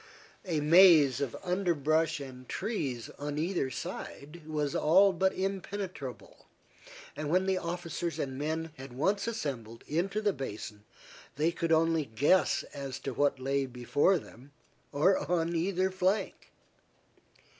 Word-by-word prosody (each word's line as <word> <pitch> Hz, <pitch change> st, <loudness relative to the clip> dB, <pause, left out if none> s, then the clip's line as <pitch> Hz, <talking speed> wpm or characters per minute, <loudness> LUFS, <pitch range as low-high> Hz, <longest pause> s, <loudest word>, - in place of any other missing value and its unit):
A 165 Hz, -5 st, -1 dB
maze 155 Hz, -5 st, +6 dB
of 135 Hz, -5 st, -2 dB
underbrush 165 Hz, -3 st, +1 dB
and 130 Hz, -2 st, -10 dB
trees 145 Hz, -, -3 dB
on 145 Hz, 0 st, -4 dB
either 165 Hz, -3 st, 0 dB
side 150 Hz, +5 st, -7 dB
was 150 Hz, -2 st, -1 dB
all 190 Hz, +5 st, +5 dB
but 190 Hz, +2 st, +2 dB
impenetrable, 190 Hz, -7 st, -5 dB, 0.7 s
and 150 Hz, 0 st, -4 dB
when 185 Hz, +3 st, +2 dB
the 190 Hz, -1 st, +1 dB
officers 170 Hz, -1 st, -4 dB
and 135 Hz, -2 st, -3 dB
men 160 Hz, +3 st, -3 dB
had 135 Hz, -1 st, -9 dB
once 195 Hz, -, 0 dB
assembled 130 Hz, -, -4 dB
into 185 Hz, +7 st, -1 dB
the 210 Hz, -2 st, +1 dB
basin, 105 Hz, -, -7 dB, 0.5 s
they 155 Hz, +4 st, +2 dB
could 165 Hz, -1 st, -2 dB
only 165 Hz, -1 st, +3 dB
guess 145 Hz, +11 st, +2 dB
as 135 Hz, -2 st, -5 dB
to 135 Hz, -, -4 dB
what 140 Hz, 0 st, +1 dB
lay 135 Hz, +1 st, 0 dB
before 130 Hz, +9 st, +2 dB
them, 140 Hz, -2 st, -13 dB, 0.4 s
or 170 Hz, +7 st, +3 dB
on 170 Hz, -1 st, +1 dB
either 185 Hz, +2 st, +1 dB
flank. 185 Hz, +2 st, -1 dB
160 Hz, 135 wpm, -30 LUFS, 140-185 Hz, 0.7 s, maze